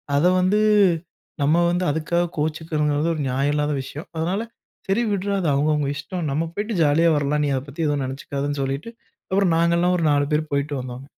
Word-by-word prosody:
அத 145 +4 +3 0.2
வந்து, 190 +3 +2 0.8
நம்ம 155 +4 +3
வந்து 180 +1 0
அதுக்காக 170 +3 0
கோவிச்சுக்கணுங்கிறது 150 0 0
ஒரு 155 - -3
நியாயம் 135 +3 0
இல்லாத 150 0 0
விஷயம். 145 +4 -8
அதனால 175 +6 -1 0.5
சரி 200 +5 +1
விட்றா! 200 0 -1
அது 170 - +1
அவுங்க 145 +3 +2
அவுங்க 145 -2 -1
இஷ்டம். 170 +4 -5
நம்ம 160 +4 -1
போயிட்டு 210 +2 -2
ஜாலியா 160 +3 +4
வரலாம். 145 +1 0
நீ - - 0
அத 130 - -1
பத்தி 155 +4 -4
எதுவும் 145 -2 0
நினைச்சிக்காதன்னு 140 +2 -3
சொல்லிட்டு 135 +11 -4 0.4
அப்புறம் 190 -3 +3
நாங்கலாம் 170 +2 +2
ஒரு 170 - -1
4 145 0 +2
பேரு 150 +1 +2
போயிட்டு 140 +1 -1
வந்தோம். 125 0 -7
150 Hz, 185 wpm, -22 LUFS, 145-175 Hz, 0.8 s, ஜாலியா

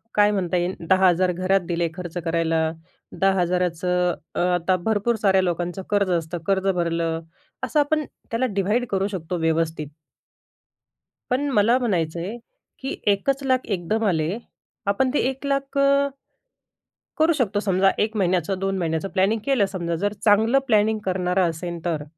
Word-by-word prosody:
काय 210 0 +5
म्हणता 180 -3 0
येईल 175 +2 -1
10,000 185 -1 +4
घरात 185 +2 +1
दिले 170 -1 0
खर्च 175 -1 -7
करायला, 165 -1 +1 0.6
10,000 180 -2 +2
चं 180 +1 0 0.2
अ, - - -1 0.2
आता 175 +2 +1
भरपूर 220 +2 +1
साऱ्या 190 -2 +4
लोकांचं 175 +1 -2
कर्ज 200 -2 +2
असतं, 170 0 -1
कर्ज 195 0 +1
भरलं, 165 -1 -1 0.4
असं 300 - +1
आपण 300 +1 +1 0.3
त्याला 235 +3 +1
डिव्हाईड 210 +6 +1
करू 195 0 +1
शकतो 180 -3 -4
व्यवस्थित. 160 -2 0 1.4
पण 280 +3 +1
मला 230 +1 +4
म्हणायचंय 180 -1 -2 0.4
की 265 +1 -4
1 200 +6 +2
चं 275 0 0
लाख 255 -1 +2
एकदम 210 +3 -1
आले. 170 +2 0 0.5
आपण 255 +6 +2
ते - - +2
1 270 +1 -7
लाख 275 0 -1
अ, 280 0 +3 1.1
करू 320 +1 +4
शकतो 220 -8 0
समजा 195 -1 +3
1 220 +1 0
महिन्याचं 185 0 0
2 195 0 -1
महिन्याचं 165 +1 -1
प्लॅनिंग 200 +3 +1
केलं 265 -8 +3
समजा. 175 -3 -3
जर 205 +5 -1
चांगलं 220 +6 +5
प्लॅनिंग 215 -1 +3
करणारा 180 0 +1
असेन 170 +1 -4
तर 160 -4 -1
190 Hz, 150 wpm, -23 LUFS, 175-220 Hz, 1.4 s, काय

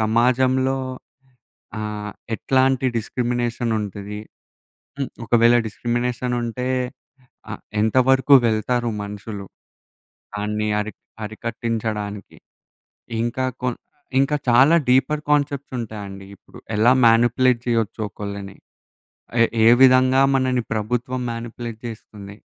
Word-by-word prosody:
సమాజంలో 130 +4 +2 1.0
ఆహ్, 105 -1 -5 0.2
ఎట్లాంటి 130 +2 +2
డిస్క్రిమినేషన్ 120 0 -2
ఉంటది, 105 0 -6 0.8
హ్మ్, 135 - -2 0.2
ఒకవేళ 120 +1 +4
డిస్క్రిమినేషనుంటే 120 +1 -2 0.8
ఆహ్, - - -6 0.2
ఎంతవరకు 130 +5 +4
వెళ్తారు 120 +2 0
మనుషులు, 100 0 -7 0.9
దాన్ని 105 +1 -2
అరి 105 +1 -4 0.3
అరికట్టించడానికి. 110 -2 -4 0.9
ఇంకా 120 +2 -1 0.2
కొన్ 125 -2 -1 0.4
ఇంకా 140 +2 +2
చాలా 130 +7 +6
డీపర్ 135 +4 +3
కాన్సెప్ట్సుంటాయండి 120 -9 -2
ఇప్పుడు, - - -17 0.2
ఎలా 110 +4 +5
మ్యానిప్యులేట్ 120 +2 +4
చేయొచ్చు 115 -2 0
ఒకళ్ళని, 100 -1 -7 0.9
ఏ - - +7 0.2
ఏ - - +9
విధంగా 130 0 +6
మనని 130 -2 +1
ప్రభుత్వం 120 +4 -2
మ్యానిపులేట్ 115 -1 -6
జేస్తుంది, 105 -3 -10
120 Hz, 90 wpm, -22 LUFS, 105-130 Hz, 1.0 s, ఏ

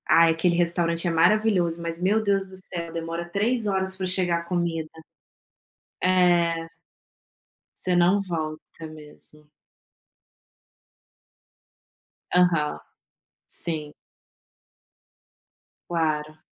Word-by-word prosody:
Ah, 165 0 +6
aquele 165 +2 +2
restaurante 170 0 +1
é - - +1
maravilhoso, 175 -1 +2
mas, 170 0 -3
meu 205 +4 +2
Deus 195 -2 0
do 190 - -8
céu, 170 -2 -4
demora 165 +1 -5
3 220 +4 0
horas 190 -1 0
pra 190 0 -3
chegar 180 -2 0
a - - -8
comida. 170 -2 -2 1.1
É. 175 -2 +3 1.2
Você 180 -1 +1
não 180 +3 +4
volta 160 -3 -6
mesmo. 150 -1 -11 2.8
Aham. 170 -4 +2 0.7
Sim. 155 -3 -1 2.0
Claro. 155 -2 -2
170 Hz, 90 wpm, -25 LUFS, 165-185 Hz, 2.8 s, Ah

